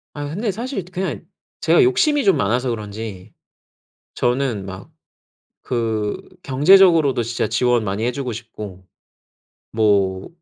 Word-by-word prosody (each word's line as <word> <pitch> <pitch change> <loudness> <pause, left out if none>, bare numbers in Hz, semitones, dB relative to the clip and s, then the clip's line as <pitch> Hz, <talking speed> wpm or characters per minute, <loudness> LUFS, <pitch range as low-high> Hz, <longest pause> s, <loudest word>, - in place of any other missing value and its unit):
아 145 0 -4
근데 200 +9 -2
사실 230 -1 -5
그냥 180 -2 -4 0.4
제가 165 +1 +4
욕심이 285 - +2
좀 195 -4 +4
많아서 120 +6 0
그런지 105 -3 -6 0.8
저는 120 -5 0
막 95 +5 -9 0.7
그 110 -4 -2 0.2
경제적으로도 150 -2 +5
진짜 115 +1 -2
지원 125 -2 +1
많이 100 +2 -3
해 - - +2
주고 125 -1 -4
싶고 105 -5 -9 0.9
뭐 100 -4 +1
120 Hz, 235 characters per minute, -20 LUFS, 105-160 Hz, 0.9 s, 경제적으로도